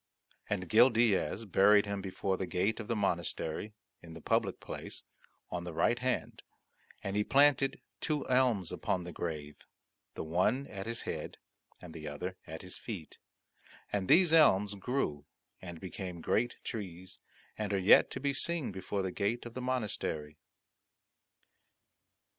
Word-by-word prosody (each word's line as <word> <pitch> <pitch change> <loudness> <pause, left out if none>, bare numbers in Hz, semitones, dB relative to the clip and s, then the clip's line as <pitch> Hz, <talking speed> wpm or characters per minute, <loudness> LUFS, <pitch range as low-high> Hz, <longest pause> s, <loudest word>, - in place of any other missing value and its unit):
And 95 -3 -1
Gil 115 +7 +7
Diaz 115 -2 +2
buried 100 +1 +5
him 100 -1 -3
before 95 0 -2
the 95 0 -3
gate 95 +6 0
of 110 - -6
the 115 - 0
monastery, 90 0 -2 0.3
in 80 -1 -11
the - - -8
public - - 0
place, - - -7 0.5
on 90 -1 -3
the 85 -1 -6
right 120 +8 +2
hand; 130 0 -2 0.6
and 100 0 -3
he 105 - +3
planted 140 +1 +4 0.2
two 150 -2 -1
elms 125 -8 +2
upon 90 - -1
the 90 - -7
grave, 75 -4 -5 0.6
the - - -4
one 95 - +1
at 100 -3 -7
his 115 0 -3
head - - -5 0.4
and 85 -3 -11
the 75 -2 -7
other 90 +6 -4
at 80 +3 -7
his 90 - -7
feet, 95 -10 -7 0.7
and 100 -2 0
these 175 -2 +6
elms 105 -11 +5
grew 100 - -2 0.3
and 85 -3 -8
became 90 -1 -6
great 115 +8 0
trees, 95 -4 -7 0.4
and 105 -1 -3
are 100 - +2
yet 95 +1 +6
to - - -5
be 140 0 0
seen 160 -1 0
before 95 +1 -3
the 95 - -2
gate 105 +7 -1
of 120 - -8
the 130 - -5
monastery. 105 -12 -3
100 Hz, 155 wpm, -32 LUFS, 90-120 Hz, 0.7 s, Gil